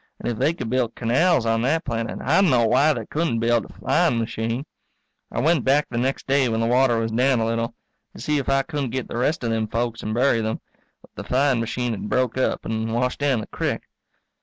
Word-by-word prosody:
And 120 Hz, -, -2 dB
if 110 Hz, -, -5 dB
they 160 Hz, -, +2 dB
could 125 Hz, -, -5 dB
build 125 Hz, -3 st, 0 dB
canals 130 Hz, +4 st, +2 dB
on 115 Hz, 0 st, +1 dB
that 155 Hz, +7 st, 0 dB
planet 115 Hz, -3 st, -3 dB
I 160 Hz, +8 st, +3 dB
d'no 130 Hz, -11 st, +4 dB
why 130 Hz, +7 st, +4 dB
they 120 Hz, -7 st, -3 dB
couldn't 155 Hz, -4 st, -1 dB
build 115 Hz, -1 st, +1 dB
a -, -, -14 dB
flying 120 Hz, -, +1 dB
machine. 115 Hz, +3 st, -2 dB, 0.7 s
I -, -, -2 dB
went 155 Hz, -1 st, +2 dB
back 140 Hz, +2 st, +3 dB
the 120 Hz, -, -1 dB
next 130 Hz, +2 st, -1 dB
day 135 Hz, -2 st, +2 dB
when 110 Hz, 0 st, -1 dB
the 115 Hz, -, +1 dB
water 125 Hz, 0 st, +3 dB
was 115 Hz, 0 st, -1 dB
down 125 Hz, +2 st, +2 dB
a 110 Hz, -, +1 dB
little, 115 Hz, 0 st, -2 dB, 0.4 s
to -, -, -10 dB
see 150 Hz, -1 st, 0 dB
if 135 Hz, -, -3 dB
I 135 Hz, 0 st, +3 dB
couldn't 140 Hz, -1 st, -3 dB
get 130 Hz, +1 st, -3 dB
the -, -, -5 dB
rest 145 Hz, +5 st, 0 dB
of 115 Hz, -, 0 dB
them 110 Hz, -1 st, 0 dB
folks 115 Hz, +1 st, -2 dB
and 110 Hz, -, -4 dB
bury 120 Hz, -2 st, +3 dB
them, 110 Hz, 0 st, -2 dB, 0.4 s
but -, -, -20 dB
the -, -, -7 dB
flying 130 Hz, -1 st, +2 dB
machine 120 Hz, +1 st, -2 dB
had 105 Hz, -1 st, -5 dB
broke 130 Hz, -2 st, +1 dB
up 130 Hz, -, -1 dB
and 110 Hz, 0 st, -2 dB
washed 125 Hz, +2 st, -1 dB
down 140 Hz, -5 st, +1 dB
the -, -, -6 dB
crick. -, -, -2 dB
120 Hz, 235 wpm, -23 LUFS, 115-135 Hz, 0.7 s, d'no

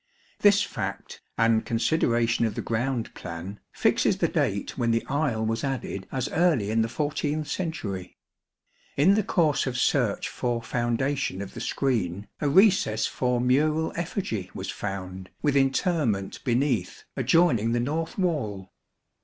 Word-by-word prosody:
This 205 Hz, 0 st, +5 dB
fact, -, -, -5 dB, 0.2 s
and 115 Hz, -1 st, +3 dB
consideration 115 Hz, -2 st, +1 dB
of 105 Hz, -, -5 dB
the -, -, -3 dB
ground 120 Hz, +1 st, -2 dB
plan, 85 Hz, +4 st, -7 dB
fixes -, -, +2 dB
the -, -, +2 dB
date -, -, -1 dB
12 -, -, -8 dB
when 115 Hz, -, +1 dB
the 115 Hz, 0 st, +1 dB
aisle 135 Hz, -6 st, 0 dB
was 115 Hz, +1 st, -1 dB
added 130 Hz, -8 st, -3 dB
as 130 Hz, 0 st, -1 dB
early 155 Hz, -, +2 dB
in 115 Hz, +1 st, +2 dB
the 110 Hz, -, +1 dB
14th 150 Hz, +3 st, -2 dB
century. 145 Hz, -, -4 dB, 0.8 s
In 155 Hz, +8 st, +5 dB
the 215 Hz, -, +3 dB
course 160 Hz, -8 st, +1 dB
of 125 Hz, -1 st, -2 dB
search -, -, +1 dB
for 120 Hz, -1 st, -2 dB
foundation 120 Hz, -2 st, -1 dB
of 100 Hz, -1 st, -6 dB
the -, -, -7 dB
screen 105 Hz, -8 st, -1 dB
a 145 Hz, -, +1 dB
recess 180 Hz, -, +4 dB
for 125 Hz, -1 st, 0 dB
mural 150 Hz, +6 st, +2 dB
effigy 165 Hz, -, -3 dB
was 95 Hz, 0 st, -4 dB
found 95 Hz, -2 st, -6 dB
with 145 Hz, -2 st, +2 dB
interment 135 Hz, -, +1 dB
beneath 120 Hz, -6 st, 0 dB
adjoining 120 Hz, -10 st, +3 dB
the 120 Hz, -, +1 dB
north 155 Hz, +6 st, -2 dB
wall. 110 Hz, -, -2 dB
125 Hz, 145 wpm, -26 LUFS, 110-150 Hz, 0.8 s, This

